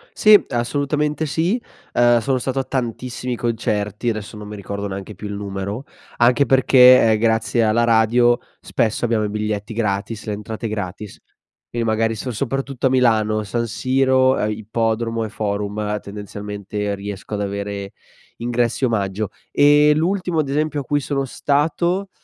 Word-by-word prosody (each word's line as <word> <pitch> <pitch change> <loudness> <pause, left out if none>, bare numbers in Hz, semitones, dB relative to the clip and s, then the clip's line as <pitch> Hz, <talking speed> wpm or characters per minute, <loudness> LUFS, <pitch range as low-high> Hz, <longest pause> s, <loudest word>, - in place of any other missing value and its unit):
Sì. 215 -1 +7
Assolutamente 145 +5 -1
sì. 170 - 0 0.3
Ehm, 120 0 +4
sono 130 +2 0
stato 130 +2 -2
a - - 0
tantissimi 125 -1 -3
concerti. 105 -2 -1
Adesso 110 -1 -5
non 105 0 -8
mi 105 - -7
ricordo 100 0 -5
neanche 100 +1 -7
più 105 +3 -7
il 105 - -5
numero, 100 +4 -5 0.3
anche 125 +4 +4
perché, 130 -1 +7
ehm, 110 - +3
grazie 115 +1 +1
alla 110 +2 +3
radio 120 +1 +4 0.2
spesso 110 +1 -1
abbiamo 115 -2 +1
i 105 - -1
biglietti 105 0 -3
gratis, 105 0 -2
le 105 - -3
entrate 110 +2 -5
gratis. 105 -1 -6 0.5
Quindi 120 -1 -2
magari 110 +1 +1
son 125 +3 -5
soprattutto 135 +2 -1
a - - +1
Milano, 110 -4 +2
San 115 +3 -2
Siro, 130 +2 +2
ehm, 105 - 0
Ippodromo 115 +1 -1
e 110 - -4
Forum, 105 0 -3
ehm, 105 0 -2
tendenzialmente 105 0 -5
riesco 100 +1 -6
ad 105 - -3
avere 100 0 -4 0.4
ingressi 120 +1 -1
omaggio. 105 -3 -1 0.2
Ehm, 145 +1 +5
l'ultimo 180 0 0
ad 145 -3 0
esempio 150 +1 0
a - - -7
cui 145 +3 0
sono 140 0 -2
stato, 165 +8 0
115 Hz, 155 wpm, -20 LUFS, 105-130 Hz, 0.5 s, Sì